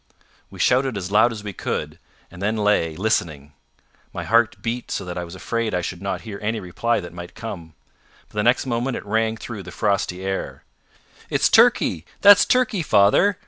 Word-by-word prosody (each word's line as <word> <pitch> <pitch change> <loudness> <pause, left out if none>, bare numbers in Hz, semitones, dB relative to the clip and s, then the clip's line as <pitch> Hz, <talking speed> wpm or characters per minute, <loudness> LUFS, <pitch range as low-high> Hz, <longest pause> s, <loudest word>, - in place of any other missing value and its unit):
We - - -13
shouted 130 -2 +2
as 95 0 -5
loud 110 +3 +4
as 110 -2 -7
we 105 -1 -6
could, - - -4 0.3
and 90 +1 -11
then 105 +2 0
lay 105 -7 +1
listening. 80 -7 -2 0.6
My - - -5
heart 115 0 +2
beat 120 +1 -3
so - - -3
that 90 -1 -6
I 90 - -3
was 85 +1 -9
afraid 115 +3 -2
I 90 - 0
should 90 +1 -5
not 95 -2 -3
hear 105 -3 -8
any 110 +1 -1
reply 110 +5 -1
that 85 -3 -9
might 85 0 -9
come. 90 -9 -8 0.5
But - - -29
the - - +2
next 120 +5 +2
moment 125 +1 -2
it - - -8
rang 110 +1 0
through 110 -2 -7
the 90 - -10
frosty 95 -2 -1
air. 95 0 -4 0.7
"It's - - +2
Turkey! 80 - +4 0.2
That's 205 -1 +8
Turkey, 250 -6 +1
father!" 150 - +4
105 Hz, 190 wpm, -22 LUFS, 90-115 Hz, 0.7 s, That's